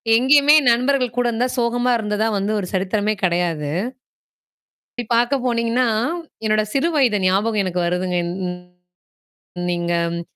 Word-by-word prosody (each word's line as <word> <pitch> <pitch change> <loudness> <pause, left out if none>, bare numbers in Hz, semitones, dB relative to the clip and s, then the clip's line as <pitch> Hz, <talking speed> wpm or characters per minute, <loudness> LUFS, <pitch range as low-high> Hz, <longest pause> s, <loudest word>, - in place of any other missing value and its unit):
எங்கயுமே 285 +5 +5 0.2
நண்பர்கள் 250 0 0
கூட 245 - +1
இருந்தா, 245 +3 -1
சோகமா 245 +1 0
இருந்ததா 215 0 -1
வந்து 200 +2 -1
ஒரு 185 - -4
சரித்திரமே 205 +3 0
கெடையாது. 170 -4 0 1.3
இப்டி - - -1
பாக்க 240 +4 +2
போனீங்கன்னா, 235 0 0 0.6
என்னோட 215 0 +2
சிறு 275 +4 +1
வயது 255 -8 +2
ஞாபகம் 205 +3 +1
எனக்கு 180 -1 -2
வருதுங்க. 180 +1 -1 1.5
நீங்க 175 0 -2 0.2
ம் 170 - -4
220 Hz, 120 wpm, -20 LUFS, 185-245 Hz, 1.5 s, எங்கயுமே